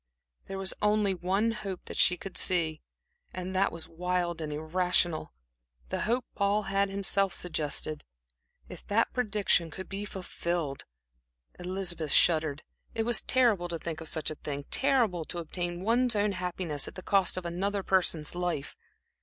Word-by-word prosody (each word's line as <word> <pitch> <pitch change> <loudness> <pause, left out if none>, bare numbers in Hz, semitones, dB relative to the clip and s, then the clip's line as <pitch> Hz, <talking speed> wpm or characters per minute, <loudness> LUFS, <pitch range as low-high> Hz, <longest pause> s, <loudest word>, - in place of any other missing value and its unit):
There 195 - -5
was 195 -1 -1
only 210 -1 +3
one 190 +5 +1
hope 200 -4 -5
that - - -7
she 180 - +5
could 190 +1 -8
see, 165 -5 +2 0.5
and 185 +1 -4
that 195 +1 +3
was 165 -1 -4
wild 175 0 -1
and 155 -1 -3
irrational; 170 +1 +1 0.6
the - - -2
hope 240 +3 +1
Paul 200 +1 +2
had 195 0 +1
himself 195 -1 +1
suggested. 155 -2 -2 0.6
If - - -10
that 220 +3 +2
prediction 210 -8 +2
could 190 +4 -8
be 200 +1 -4
fulfilled! 170 -6 -3 0.7
Elizabeth 180 -4 -1
shuddered. 155 -3 +3 0.3
It 225 - +1
was 235 0 +3
terrible 230 -9 +3
to 170 -1 -3
think 160 -1 -5
of 160 - -5
such 155 -1 0
a - - -5
thing; 140 -1 -4
terrible 240 - +2
to 175 - -6
obtain 175 +1 -4
one's 235 +2 +3
own 205 0 +2
happiness 180 -5 -2
at - - -9
the 185 - -7
cost 195 -3 +2
of 185 - -4
another 195 +4 -1
person's 175 -6 +2
life. 175 -5 -2
180 Hz, 160 wpm, -30 LUFS, 170-200 Hz, 0.7 s, she